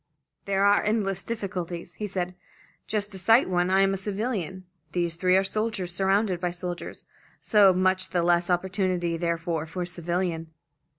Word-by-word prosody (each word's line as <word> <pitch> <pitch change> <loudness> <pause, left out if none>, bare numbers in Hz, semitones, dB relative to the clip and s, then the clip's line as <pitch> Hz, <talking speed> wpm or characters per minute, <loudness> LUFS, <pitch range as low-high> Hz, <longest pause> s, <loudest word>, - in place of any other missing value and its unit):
"There 195 0 +2
are 205 0 +4
endless 200 -3 0
difficulties," 180 -6 -4
he 210 - -4
said. 180 -2 -3 0.5
"Just 210 -1 -2
to 190 - -7
cite 225 +7 +5
one: 180 -1 +1
I 190 +1 +4
am 195 0 +3
a - - -1
civilian, 195 -2 -3 0.3
these 170 -2 0
three 185 +2 +3
are 190 - +3
soldiers, 195 -3 -2
surrounded 195 0 +1
by 180 0 -1
soldiers; 175 0 -6 0.3
so 205 -3 +5
much 185 +1 +1
the 175 -2 0
less 175 0 +2
opportunity 180 -1 0
therefore 165 -1 -2
for 180 +3 -4
a - - -3
civilian." 175 -1 -2
185 Hz, 165 wpm, -26 LUFS, 175-195 Hz, 0.5 s, cite